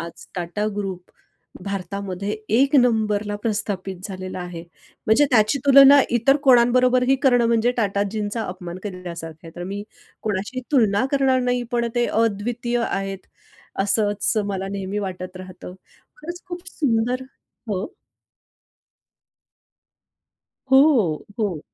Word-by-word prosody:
आज 170 0 -9
TATA 175 +5 -2
group 190 -3 -5 0.5
भारतामध्ये 200 +1 -4 0.2
एक 275 +3 +3
नंबरला 215 -4 +2
प्रस्थापित 200 -4 -2
झालेला 185 -1 -6
आहे. 175 -2 -7 0.4
म्हणजे 220 +7 +5
त्याची 220 +2 +3
तुलना 275 +1 +8 0.2
इतर 270 +4 +4
कोणांबरोबरही 250 +1 +4
करणं 245 -4 +4
म्हणजे 230 +1 +2
टाटाजींचा 205 +1 -1
अपमान 180 -1 -7
केलेल्यासारखं 170 -5 -8
आहे. - - -9
तर 175 - -5
मी 200 +2 -5 0.4
कोणाशी 210 +5 -3
तुलना 220 -4 +3
करणार 265 -2 +2
नाही. 245 0 0
पण 235 -1 +1
ते 240 0 +2
अद्वितीय 230 +3 -1
आहेत 195 -1 -4 0.6
असंच 205 0 +1
मला 195 -1 -3
नेहमी 200 +1 -3
वाटत 185 -2 -5
राहतं. 185 -1 -10 0.4
खरंच 345 +4 -8
खूप 350 0 -6
सुंदर 250 -4 0 0.5
हो. 200 +5 -2 2.8
हो, 265 - +4
हो. 200 -8 -1
210 Hz, 115 wpm, -22 LUFS, 190-245 Hz, 2.8 s, तुलना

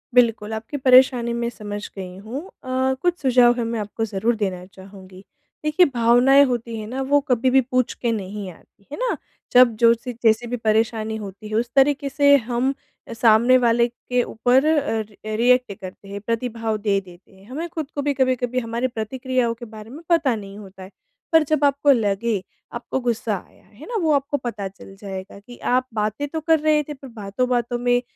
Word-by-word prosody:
बिल्कुल, 225 -3 +3
आपकी 220 +6 -5
परेशानी 255 -2 +5
मैं 235 0 -2
समझ 205 -3 -7 0.2
गई 185 -1 -7
हूँ, 235 +6 -5 0.2
अ, 260 0 0
कुछ 355 0 +1
सुझाव 250 -3 +5
है 240 - -1
मैं 230 - -2
आपको 210 +2 -3
ज़रूर 220 +3 -1
देना 185 -3 -2
चाहूँगी। 190 -1 -13 0.4
देखिए 305 +4 +4
भावनाएँ 245 +4 +5
होती 235 -3 -3
हैं 215 - -7
ना, 260 +4 -4
वो 285 +2 +3
कभी 250 +1 +2
भी 265 +1 +5
पूछ 255 -1 +1
के 235 - +2
नहीं 200 -2 -5
आती, 200 +4 -23
है - - -6
ना? - - -1 0.3
जब 245 -2 +6
जो 230 0 +7
सी 245 +2 -6
जैसे 225 +1 +3
भी 245 +1 -3
परेशानी 220 0 +1
होती 200 +2 -9
है 215 - -3
उस 235 +2 0
तरीके 280 +1 +3
से 285 +1 +5
हम 250 +2 0 0.4
सामने 230 +2 +5
वाले 235 -1 +3
के 245 +1 -2
ऊपर 250 +5 +2
अ 285 -8 +1
अ, - - -4 0.3
रिएक्ट 250 -1 +3
करते 190 +1 -11
हैं 200 0 -6
प्रतिभाव 230 0 -2
दे 200 -1 +2
देते 175 0 -17
हैं, 190 +1 -19
हमें 310 +6 -4
खुद 315 -4 -5
को 285 - -1
भी 285 0 0
कभी-कभी 255 -1 +1
हमारी 235 +1 -2
प्रतिक्रियाओं 250 +1 -1
के 235 +1 -10
बारे 215 0 -10
में 285 +6 -10
पता 310 -8 +3
नहीं 200 -2 -9
होता 190 -2 -12
है, 185 - -12 0.4
पर 325 -1 +6
जब 305 -2 +2
आपको 285 +1 +3
लगे 215 -3 +1 0.4
आपको 245 +2 -4
गुस्सा 235 -1 0
आया - - -25
है - - -15
ना, 485 - -6
वो 320 -2 +2
आपको 280 0 0
पता 210 -4 -3
चल 195 0 -14
जाएगा 195 -1 -7
कि 240 +4 -14 0.2
आप 255 0 +1
बातें 215 +6 -2
तो 320 +3 -4
कर 320 0 +3
रहे 305 0 +2
थे 295 - -7
पर 270 -1 -12
बातों-बातों 240 +4 -1
में 245 0 +2
240 Hz, 200 wpm, -22 LUFS, 215-265 Hz, 0.4 s, जो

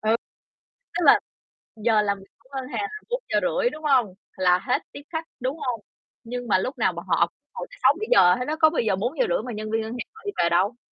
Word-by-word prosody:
Ừ. 215 - +1 0.9
Tức - - 0
là - - +8 0.6
giờ 220 -1 +3
làm 200 -1 0
việc 195 - -15
của 260 - -27
ngân 260 -1 -3
hàng - - -2
là 425 +1 -5
4:30, - - 0
đúng 310 -6 -10
hông? 255 -10 +3 0.2
Là 180 -1 +4
hết 255 - 0
tiếp 285 - -9
khách, 320 -1 -3
đúng 260 +5 -2
hông? 245 -3 -2 0.4
Nhưng 245 +1 -5
mà 200 - +4
lúc 255 +9 -3
nào - - +2
bọn - - -7
họ - - +3 0.2
ngồi - - -6
tới - - -14
6:00-7:00 185 - +5
hết 250 - -4
á, 310 - 0
có 315 - +7
bao 315 - 0
giờ 210 -4 +1
4:30 320 - 0
mà 245 - -5
nhân 215 +1 -5
viên 225 0 +1
ngân 220 +1 -5
hàng 245 - -5
họ 445 - -14
đi 405 - -1
về 170 - +3
đâu? 195 +8 +2
245 Hz, 235 wpm, -25 LUFS, 210-320 Hz, 0.9 s, là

